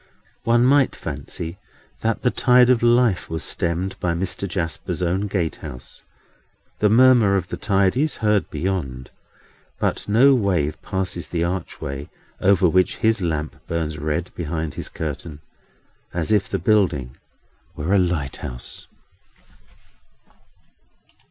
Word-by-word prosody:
One 120 +1 +4
might 140 0 +4
fancy 85 +3 -6 0.4
that 115 -1 -1
the 125 - +3
tide 125 0 +5
of 125 - +3
life 120 -4 +3
was 80 0 -3
stemmed 85 +3 -1
by 85 -2 0
Mr. 90 +2 -2
Jasper's 85 0 -3
own 95 +4 0
gatehouse. 80 -9 -5 0.8
The 105 - +4
murmur 120 -3 +6
of 90 -2 -1
the - - -3
tide 95 -2 +2
is 150 +2 0
heard 105 -2 +1
beyond; 75 -7 -3 0.7
but - - -1
no 130 +7 +6
wave 90 - 0
passes 95 -2 -3
the 85 -1 -1
archway, 80 -5 -4 0.3
over 95 -1 +4
which 90 +2 +2
his 110 -2 +2
lamp 80 -3 -2
burns 80 -2 -2
red 75 +4 -2
behind 80 -2 -3
his - - -6
curtain, 75 -1 -6 0.8
as 85 +3 -1
if 105 -2 +2
the - - -1
building 85 - +1 0.6
were 80 +6 -1
a 100 - +5
Lighthouse. 70 -8 -3
90 Hz, 125 wpm, -22 LUFS, 80-105 Hz, 0.8 s, murmur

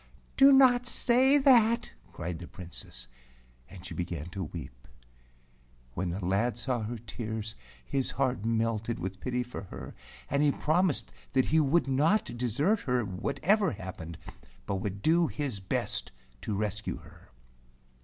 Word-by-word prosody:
"Do 275 +1 +8
not 250 -2 +6
say 260 +4 +4
that," 235 -4 +4 0.2
cried 85 -1 -5
the 85 - -8
Princess, 85 -9 -8 0.6
and 95 -1 -11
she - - -6
began 85 -1 -4
to 95 -1 -4
weep. 75 -6 -9 1.1
When 90 +6 -2
the 90 +2 -3
lad 105 +6 +1
saw 120 -1 -1
her 115 +3 -4
tears, 110 -1 -5 0.3
his 135 - 0
heart 130 -5 0
melted 115 0 0
with 95 +1 -5
pity 125 +1 -1
for 125 -3 -7
her, - - -9 0.3
and 140 +1 +1
he 150 -1 +4
promised 165 +1 +1 0.2
that 130 -1 +3
he 160 - +3
would 155 +2 +3
not 150 - +2
desert 135 - +1
her, 125 - 0
whatever 150 - +1
happened, 90 -5 -7 0.5
but 100 - -1
would 100 +1 -4
do 165 +1 +4
his 140 -10 -3
best 95 - -1 0.3
to 105 - -3
rescue 105 0 -2
her. - - -16
120 Hz, 145 wpm, -29 LUFS, 95-155 Hz, 1.1 s, Do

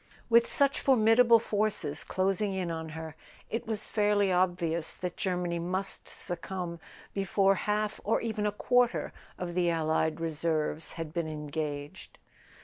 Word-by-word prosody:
With 235 0 +5
such 280 -1 +3
formidable 235 -2 +6
forces 210 -9 -1
closing 195 +1 0
in 180 -3 -2
on 160 -1 -4
her 160 -1 -7 0.4
it 230 0 -3
was 215 -2 -3
fairly 205 -2 +2
obvious 175 -3 +1
that 180 -1 -4
Germany 180 -2 -1
must 185 +3 -3
succumb 175 -1 -5 0.3
before 195 0 +3
half 210 +2 -1
or 215 - +2
even 220 -2 -1
a - - +1
quarter 245 +3 +1 0.2
of 175 -1 -4
the 175 -1 +2
allied 160 -1 +1
reserves 160 -1 -1
had 165 -2 -6
been 170 -2 -1
engaged. 150 -1 -5
180 Hz, 140 wpm, -30 LUFS, 165-210 Hz, 0.4 s, formidable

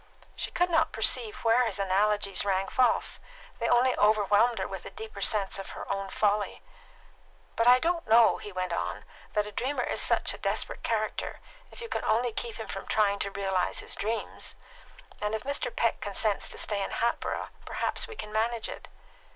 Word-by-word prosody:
She - - -3
could 355 0 +1
not 320 -1 +3
perceive 220 0 +2
where 230 +2 +4
his 210 - -2
analogies 200 +1 +2
rang 195 -1 0
false; 255 -1 +2 0.4
they 230 - 0
only 250 +1 +4
overwhelmed 210 +2 +4
her 190 - -2
with 195 -2 -6
a - - -7
deeper 220 -2 -9
sense 200 -1 +2
of 195 - -7
her - - -7
own 195 0 -4
folly. 210 0 0 0.9
"But 230 - +2
I 250 +1 +9
don't 335 +5 -1
know," 225 +1 +6
he 205 - -8
went 185 -2 -2
on, - - -3 0.3
"that 210 0 +1
a 210 - -7
dreamer 260 +7 -1
is - - -1
such - - +2
a - - -9
desperate - - -1
character, - - -2 0.3
if - - -12
you 465 - -5
can - - -3
only 235 +1 +1
keep 230 0 -4
him 220 - -7
from 195 - -6
trying 200 -2 +2
to 200 - -1
realise 195 -2 -1
his - - -6
dreams; 225 +2 -3 0.7
and 210 +1 0
if 220 - -4
Mr. 280 -1 0
Peck 230 -1 0
consents 205 +1 0
to - - -7
stay 205 -2 0
in 195 - -2
Hatboro', 235 0 -1 0.2
perhaps - - -2
we 450 - -9
can 215 - -7
manage 225 +1 0
it." - - -8
215 Hz, 190 wpm, -29 LUFS, 200-235 Hz, 0.9 s, I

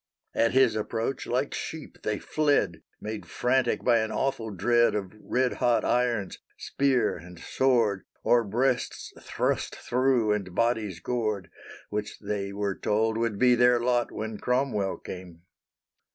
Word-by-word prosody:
At 115 - +2
his 130 -4 +4
approach 115 +4 -2
like 130 +3 -1
sheep 160 -2 -6
they 105 -1 -1
fled, 145 - +1 0.2
Made 110 0 -6
frantic 125 0 +1
by 120 -2 +4
an 110 0 -1
awful 110 0 -1
dread 120 +5 +2
Of 95 -2 -3
red 125 +3 0
hot 120 -1 +3
irons, 120 -5 0 0.2
spear, 135 -3 +1
and 90 0 -12
sword, 115 -7 +1 0.2
Of 120 -4 +3
breasts 125 +4 -1
thrust - - -1
thro', 125 -3 +1
and 95 -4 -2
bodies 110 -7 0
gored, 105 -6 -2 0.4
Which 105 0 -3
they 100 -1 -3
were 100 -1 -3
told 110 +1 +1
would 115 -3 -1
be 125 +3 +5
their 120 0 +5
lot 120 0 +1
When 110 0 -5
Cromwell 125 -6 0
came. 90 -2 -9
115 Hz, 140 wpm, -27 LUFS, 105-125 Hz, 0.4 s, be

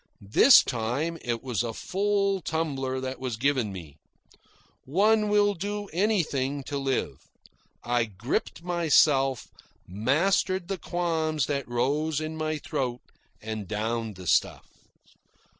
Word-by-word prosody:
This 270 - +8
time 135 +8 -2
it 120 -2 -3
was 125 -6 -1
a 115 -2 -4
full 200 0 0
tumbler 135 -6 -2
that 130 0 -5
was 125 -4 -4
given 130 -4 +1
me. 80 -6 -10 0.9
One 210 +8 +2
will 205 0 +3
do 205 +2 -4
anything 150 -9 0
to 140 +1 -4
live. 135 -1 -2 0.6
I 120 -1 +1
gripped 110 - -3
myself, 150 -7 +2 0.4
mastered 170 - +1
the 195 -2 -3
qualms 160 -4 -1
that 140 -2 -2
rose 145 +6 0
in 155 0 -4
my 155 0 -2
throat, 130 -5 -3 0.4
and 110 -2 -5
downed 110 +1 -2
the 90 0 -10
stuff. - - +1
140 Hz, 125 wpm, -27 LUFS, 120-175 Hz, 0.9 s, This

